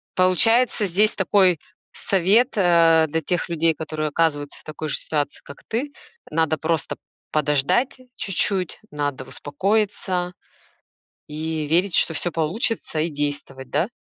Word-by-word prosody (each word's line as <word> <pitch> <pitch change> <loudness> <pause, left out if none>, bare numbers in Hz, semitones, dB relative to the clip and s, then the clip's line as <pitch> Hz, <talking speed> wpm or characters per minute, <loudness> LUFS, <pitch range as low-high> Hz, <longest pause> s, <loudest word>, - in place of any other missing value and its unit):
Получается, 215 +5 +3
здесь 200 +4 +2
такой 185 -4 +3 0.3
совет, 200 +7 +2
э, 165 -3 +5
для 160 +2 -2
тех 175 +3 -2
людей, 165 -1 +2
которые 155 -1 -4
оказываются 145 -2 -1
в - - -19
такой 155 0 -6
же - - 0
ситуации, 145 -2 -2
как 140 - -13
ты. 255 +6 -2 0.4
Надо 160 0 +1
просто 160 -2 -2 0.3
подождать 150 - +1 0.2
чуть-чуть, 190 -2 -1
надо 145 -3 -3
успокоиться 185 +3 -1 0.9
и 155 0 -3
верить, 175 +4 +2
что 165 - +3
всё 175 +2 -1
получится, 165 +2 -1
и 165 - 0
действовать, 145 -3 -4
да? 180 - +1
165 Hz, 130 wpm, -22 LUFS, 150-190 Hz, 0.9 s, э